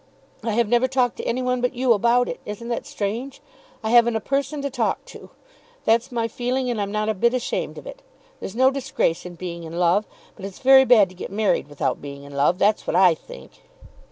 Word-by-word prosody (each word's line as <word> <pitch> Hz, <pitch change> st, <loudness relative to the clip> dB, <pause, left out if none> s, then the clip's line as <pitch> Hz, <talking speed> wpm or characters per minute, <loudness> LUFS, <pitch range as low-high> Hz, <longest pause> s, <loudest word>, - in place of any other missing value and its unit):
I 225 Hz, -1 st, -1 dB
have 235 Hz, 0 st, +2 dB
never 240 Hz, +3 st, +3 dB
talked 255 Hz, -2 st, 0 dB
to -, -, -5 dB
any 255 Hz, +2 st, -1 dB
one 250 Hz, 0 st, 0 dB
but 250 Hz, +1 st, -1 dB
you 250 Hz, -1 st, +3 dB
about 235 Hz, +3 st, +2 dB
it. 245 Hz, -, -5 dB
Isn't 210 Hz, +3 st, -7 dB
that 235 Hz, -, -3 dB
strange? 230 Hz, +7 st, -4 dB, 0.4 s
I 220 Hz, -, -1 dB
haven't 235 Hz, -1 st, +5 dB
a -, -, +1 dB
person 275 Hz, +4 st, -2 dB
to 280 Hz, -, -2 dB
talk -, -, -1 dB
to. -, -, -13 dB, 0.6 s
That's 230 Hz, +3 st, +2 dB
my 230 Hz, -2 st, -1 dB
feeling, 250 Hz, +2 st, -2 dB
and 220 Hz, -3 st, -2 dB
I'm 200 Hz, 0 st, -3 dB
not 215 Hz, 0 st, -1 dB
a 220 Hz, -, +1 dB
bit 235 Hz, +5 st, +1 dB
ashamed 250 Hz, -, -3 dB
of -, -, -10 dB
it. -, -, -10 dB, 0.4 s
There's 195 Hz, -, -7 dB
no 260 Hz, +2 st, +4 dB
disgrace 265 Hz, -11 st, -1 dB
in 175 Hz, -, -10 dB
being 170 Hz, -1 st, -6 dB
in 165 Hz, +1 st, -7 dB
love. 180 Hz, +4 st, +2 dB, 0.3 s
But 195 Hz, -, -9 dB
it's 195 Hz, -1 st, -8 dB
very 265 Hz, 0 st, +6 dB
bad 215 Hz, -7 st, +5 dB
to 185 Hz, -, -15 dB
get 180 Hz, -, -7 dB
married 205 Hz, -6 st, 0 dB
without 145 Hz, -1 st, -2 dB
being 140 Hz, -1 st, -9 dB
in 140 Hz, 0 st, -12 dB
love. 140 Hz, +5 st, +2 dB
That's 210 Hz, +2 st, +1 dB
what -, -, -1 dB
I 180 Hz, -1 st, +6 dB
think." -, -, -13 dB
230 Hz, 230 wpm, -23 LUFS, 195-250 Hz, 0.6 s, very